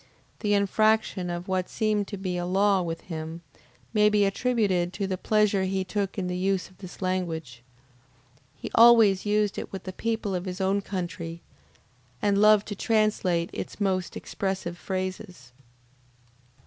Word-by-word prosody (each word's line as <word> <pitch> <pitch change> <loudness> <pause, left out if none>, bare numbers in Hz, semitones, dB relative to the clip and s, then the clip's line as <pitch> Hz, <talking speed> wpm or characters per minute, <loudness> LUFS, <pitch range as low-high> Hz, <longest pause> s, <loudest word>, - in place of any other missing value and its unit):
This 210 - -1
infraction 210 -2 +1
of 175 +1 -4
what 185 -1 -1
seemed 215 -2 0
to 200 - -6
be 185 -1 -3
a 175 - -2
law 195 +1 +3
with 165 -1 -4
him, 165 0 -7 0.5
may 210 -1 +5
be 210 -1 +3
attributed 195 -5 0
to 200 - -2
the 190 -1 -2
pleasure 205 0 +2
he 190 0 -1
took 200 +1 -3
in 190 - -1
the 180 0 -2
use 190 0 0
of 185 - -23
this 185 0 -9
language. 165 -9 -3 0.9
He - - -7
always 225 -4 +6
used 210 -1 +1
it - - -7
with 190 -2 -6
the 185 - -6
people 225 -1 -2
of 180 0 -3
his 185 0 -5
own 195 +1 +1
country, 170 -3 -5 0.8
and 200 -1 +2
loved 210 -1 +5
to 205 - -4
translate 200 -6 +1
its - - -6
most 185 -3 -1
expressive 190 -3 -3
phrases. 185 - -5
190 Hz, 160 wpm, -26 LUFS, 180-205 Hz, 0.9 s, always